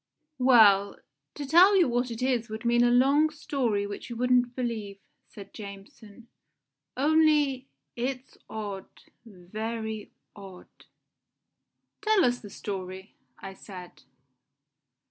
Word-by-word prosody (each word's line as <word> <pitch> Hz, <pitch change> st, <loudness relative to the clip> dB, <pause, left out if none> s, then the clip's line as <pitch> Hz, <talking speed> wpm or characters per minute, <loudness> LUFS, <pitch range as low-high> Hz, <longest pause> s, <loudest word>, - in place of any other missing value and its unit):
"Well, 210 Hz, -6 st, +5 dB, 0.4 s
to 290 Hz, -, -5 dB
tell 360 Hz, +8 st, +6 dB
you 355 Hz, -, +4 dB
what 245 Hz, +1 st, -1 dB
it 230 Hz, +1 st, -5 dB
is 245 Hz, -3 st, 0 dB
would 220 Hz, +2 st, -7 dB
mean 240 Hz, 0 st, +3 dB
a 240 Hz, -, +4 dB
long 275 Hz, +5 st, +4 dB
story 255 Hz, -9 st, -2 dB
which 205 Hz, +4 st, -8 dB
you 235 Hz, -, -6 dB
wouldn't 245 Hz, 0 st, +1 dB
believe," 225 Hz, -5 st, -4 dB, 0.3 s
said 200 Hz, -2 st, -13 dB
Jameson; 205 Hz, +2 st, -12 dB, 0.7 s
"only 295 Hz, -2 st, +2 dB, 0.3 s
it's 255 Hz, +2 st, -4 dB
odd 205 Hz, -3 st, -6 dB, 0.3 s
very 220 Hz, +2 st, -6 dB, 0.2 s
odd." 195 Hz, -3 st, -14 dB, 1.2 s
"Tell 430 Hz, -3 st, +3 dB
us 245 Hz, 0 st, +1 dB
the 205 Hz, -, -11 dB
story," 190 Hz, -1 st, -7 dB, 0.2 s
I 195 Hz, -, -9 dB
said. 185 Hz, -2 st, -12 dB
235 Hz, 115 wpm, -27 LUFS, 205-260 Hz, 1.2 s, tell